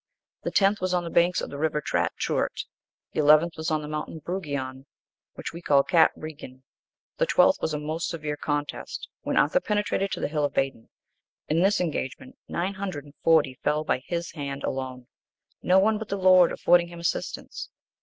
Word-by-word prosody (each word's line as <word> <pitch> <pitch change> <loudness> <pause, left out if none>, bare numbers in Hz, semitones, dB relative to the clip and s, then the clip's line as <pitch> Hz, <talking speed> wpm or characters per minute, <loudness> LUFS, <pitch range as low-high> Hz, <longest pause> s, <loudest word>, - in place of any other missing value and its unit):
The - - -2
tenth 200 0 +3
was 185 0 0
on 175 - 0
the 170 - -6
banks 175 +1 +3
of - - -5
the 140 - -6
river 155 -1 +1
Trat 85 - 0
Treuroit.(9) - - -1 0.5
The - - -2
eleventh 155 +3 +5
was 160 +1 -3
on 155 -1 0
the - - -6
mountain 150 +2 -4
Breguoin, 140 -6 -4 0.5
which - - -6
we 170 - -8
call 140 -4 +4
Cat 165 -1 +5
Bregion.(10) 140 -4 -9 0.6
The - - +2
twelfth - - +4
was 155 - -1
a - - -2
most 155 +3 -3
severe 155 -3 -3
contest, 145 0 -4
when - - -2
Arthur - - +4
penetrated 205 - 0
to - - -3
the - - -1
hill 150 0 -1
of 145 - 0
Badon.(11) 135 -4 -1 0.6
In 160 +3 +2
this 200 +2 +3
engagement, 170 - -3
nine 185 +3 -2
hundred 190 -7 -5
and 145 - -15
forty 150 -6 +3
fell 150 +1 +1
by 140 - 0
his 170 -1 -3
hand 140 -3 -5
alone, 130 -1 -4 0.6
no 185 - +4
one 210 +2 +3
but 220 - -7
the 200 - -1
Lord 185 -2 +6
affording 175 0 +3
him 170 0 -10
assistance. 170 - -3
160 Hz, 195 wpm, -26 LUFS, 145-180 Hz, 0.6 s, Lord